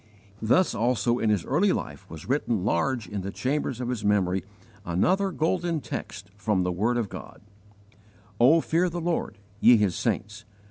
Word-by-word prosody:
Thus 145 +12 +3
also 120 0 +1
in 110 - +1
his 105 -5 +1
early - - +2
life - - -5
was 80 -1 -10
written 120 -7 0
large 110 +4 0
in 100 +1 -4
the 95 - -4
chambers 130 +2 -2
of 125 -1 -3
his 120 -4 -3
memory 95 -3 +1 0.4
another 180 - +1
golden 170 -1 0
text 120 -5 -7
from 105 -2 0
the 90 - 0
word 110 +7 0
of 115 -3 -1
God: - - -10 1.0
"O 145 +8 +6
FEAR 175 +4 +1
THE 175 +1 -4
LORD, 165 -10 -2 0.2
YE 120 +1 +7
HIS 100 -4 +1
SAINTS! 105 +2 -2
115 Hz, 170 wpm, -26 LUFS, 100-150 Hz, 1.0 s, YE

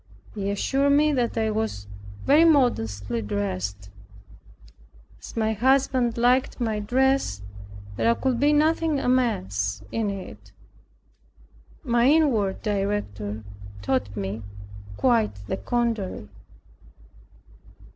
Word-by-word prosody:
They 200 -1 -2
assured 275 +8 +1
me 300 +1 +4
that 240 -3 -1
I 220 -1 +1
was 215 - -3 0.4
very 295 +4 +6
modestly 115 - +2
dressed. 100 -1 -4 1.3
As - - -11
my 220 -1 +1
husband 255 0 +2
liked 250 +3 +2
my 220 -3 -1
dress 255 - +1 0.5
there 230 0 +3
could 255 -2 -1
be 290 +1 +4
nothing 310 0 +2
amiss 100 - 0
in 225 -2 -1
it. 195 -1 -8 1.3
My 240 -2 +2
inward 260 -11 +2
Director 195 - -2 0.4
taught 105 -4 -1
me 100 +2 -4 0.6
quite 230 - +2
the 100 - -3
contrary. 225 - -2
220 Hz, 100 wpm, -25 LUFS, -, 1.3 s, very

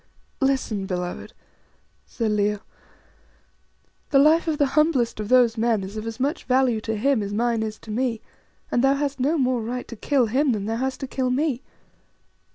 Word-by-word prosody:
"Listen, 260 -7 0
beloved," 180 -1 -4 0.8
said 225 -3 -2
Leo. 210 0 0 1.5
"The 280 - +3
life 310 +4 +5
of 310 -2 0
the 290 - +3
humblest 300 -8 +2
of 210 -1 -4
those 245 -3 +4
men 225 -3 +1
is 195 +2 -7
of 215 +1 -5
as 225 +2 -6
much 285 +6 -1
value 255 -3 +2
to 220 0 -3
him 265 +1 +2
as 200 0 -4
mine 235 0 +1
is 215 -1 -3
to 220 - -9
me, 235 0 -1 0.5
and 240 - +2
thou 270 +1 +4
hast 280 -1 -2
no 290 +6 +1
more 255 -3 +1
right 245 +3 -4
to 235 - -8
kill 265 +3 +1
him 260 +4 +1
than 200 -2 -3
thou 225 +1 -2
hast 260 +1 -3
to 270 - -3
kill 255 -1 -1
me. 265 0 0
245 Hz, 185 wpm, -24 LUFS, 220-270 Hz, 1.5 s, life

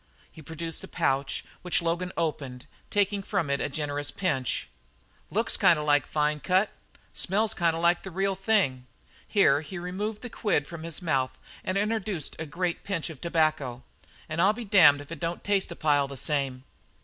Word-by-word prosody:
He 160 - -12
produced 165 +1 -5
a - - -7
pouch 135 +1 -1 0.2
which 180 0 +1
Logan 170 +2 -1
opened, 140 -6 -2 0.2
taking 205 0 +1
from 190 -7 -1
it 140 - +1
a - - -1
generous 145 0 -2
pinch. 135 -7 -1 0.6
"Looks - - +2
kind 170 - +5
of 150 - -3
like 145 -1 +3
fine 150 0 +1
cut 185 +6 +2 0.4
smells 210 +4 +1
kind 170 -2 +1
of 165 - -4
like 175 +1 +4
the 190 - -7
real 195 +2 0
thing" 190 - +1 0.4
here 150 -9 +4
he 160 +4 -7
removed 200 +5 -4
the 245 - -5
quid 170 -9 +1
from 170 +1 -8
his 165 +2 -3
mouth 135 -6 0 0.3
and 185 - -1
introduced 210 -5 -1
the 160 - -4
great 175 +3 -2
pinch 175 -4 -2
of 150 - -12
tobacco 155 -7 0 0.4
"an' 155 +1 -4
I'll 195 +4 +5
be 235 +1 -6
damned 175 -8 +6
if 145 - -13
it 165 - -6
don't 170 0 -3
taste 200 -3 +1
a - - -5
pile 145 -3 +2
the 140 0 -8
same!" 135 -3 -1
165 Hz, 185 wpm, -28 LUFS, 145-190 Hz, 0.6 s, damned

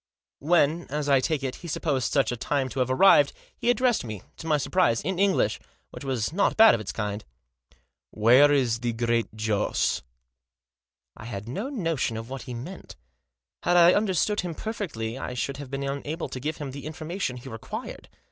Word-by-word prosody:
When, 165 +1 +2
as 150 +1 -2
I 140 -2 +5
take 145 +1 -1
it, 130 -1 -3
he 175 - -10
supposed 145 -5 -1
such 135 -5 +2
a - - -2
time 135 +2 -1
to 130 - -5
have 130 0 +1
arrived, 145 0 +5 0.2
he 240 - -1
addressed 245 -1 +2
me, 110 -5 -7
to 165 - -8
my 155 -2 +3
surprise, 145 -5 +1
in 190 -1 -2
English, 195 -1 +2 0.3
which - - -9
was 130 -1 -2
not 200 - +1
bad 225 -1 +8
of 110 - -1
its 100 - -5
kind. 105 -1 -4 0.5
" - - -36
Where 130 +6 +7
is 125 -5 +2
the 120 0 -2
Great 115 -1 -1
Joss? 110 -1 0 0.6
" 60 0 -66
I 110 - -11
had 105 -2 -6
no 200 - -4
notion 165 - -1
what 135 0 -6
he 125 - -4
meant. 155 +11 -9 0.7
Had 175 0 +3
I 175 +1 +7
under 205 -3 +1
stood 210 +5 +1
him 175 -2 -5
perfectly 140 - -4
I 125 - -5
should 140 +3 -3
have 140 -2 -8
been 135 +1 -4
unable 140 +4 -4
to 130 - -6
give 150 +4 -3
him 145 -3 -5
the 140 +2 -7
information 160 -3 -4
he 125 - -11
required. 115 -3 -7
140 Hz, 195 wpm, -26 LUFS, 120-170 Hz, 0.7 s, bad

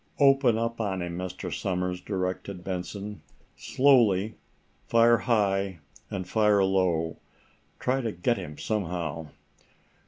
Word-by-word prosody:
"Open 135 -5 +5
up 115 0 -2
on 95 -4 -2
him, 85 -1 -5
Mr. 90 0 -5
Somers," 90 -1 -2
directed 95 -1 -4
Benson. 100 +3 -5 0.3
"Slowly. 115 -7 +3 0.5
Fire 115 0 +5
high, 100 -5 +1 0.3
and 95 -2 -4
fire 105 -1 +3
low. 90 -4 +1 0.6
Try 130 +2 0
to 115 -3 -2
get 100 +6 0
him 75 0 -7
somehow." 85 -7 -3
100 Hz, 115 wpm, -27 LUFS, 90-115 Hz, 0.6 s, Open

